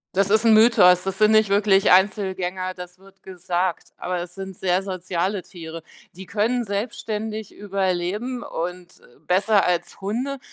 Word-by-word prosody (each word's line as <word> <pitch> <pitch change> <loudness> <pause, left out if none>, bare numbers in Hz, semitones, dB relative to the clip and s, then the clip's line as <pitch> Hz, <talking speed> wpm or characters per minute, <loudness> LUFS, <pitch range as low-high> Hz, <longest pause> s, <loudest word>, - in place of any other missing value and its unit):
Das 195 +1 +2
ist 220 +1 +4
'n 225 -1 +5
Mythos, 210 -6 +6
das 195 0 -4
sind 215 0 +5
nicht 215 -1 +4
wirklich 200 -1 +3
Einzelgänger. 185 -1 +1
Das 180 0 -10
wird 195 0 -21
gesagt, 180 -1 -3
aber 180 0 -3
es 175 0 -6
sind 190 -1 -8
sehr 185 0 +1
soziale 185 0 -3
Tiere. 165 -3 -10 0.3
Die 190 +2 -10
können 225 +5 0
selbstständig 215 0 -4
überleben 200 +5 -2
und, 180 0 -6
äh, 120 - -22
besser 200 +3 +3
als 175 0 -2
Hunde. 250 +8 -3
190 Hz, 155 wpm, -22 LUFS, 180-210 Hz, 0.3 s, Mythos